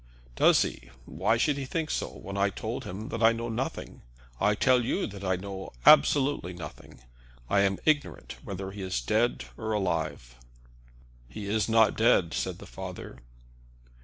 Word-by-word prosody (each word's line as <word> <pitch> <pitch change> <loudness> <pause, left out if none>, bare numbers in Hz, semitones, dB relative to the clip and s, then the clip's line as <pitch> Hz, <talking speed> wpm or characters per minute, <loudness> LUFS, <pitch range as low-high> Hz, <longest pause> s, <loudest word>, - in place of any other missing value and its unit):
"Does - - +5
he? - - -7 0.2
Why 115 - 0
should 145 +4 +1
he 135 - -3
think 160 +4 -3
so, - - -1
when 100 - -9
I 100 0 +2
told 115 +5 -5
him 105 +2 -6
that 115 - -4
I 115 0 +6
know 115 +1 -4
nothing? 120 +4 -4 0.4
I 105 0 +3
tell 125 +2 +3
you - - -1
that 100 -2 -8
I 95 -1 +1
know 95 -2 -7
absolutely 135 - +5
nothing. 85 - -10 0.5
I 100 - +4
am 100 -1 +2
ignorant 150 -2 0
whether 95 0 -6
he 100 0 -8
is 95 -9 -2
dead 110 - 0
or 110 -1 -3
alive." 80 - -2 0.9
"He 100 +11 -7
is 105 +2 0
not 110 -2 +4
dead," 110 -7 +3
said - - -2
the - - -11
father. - - -8
105 Hz, 165 wpm, -28 LUFS, 95-115 Hz, 0.9 s, I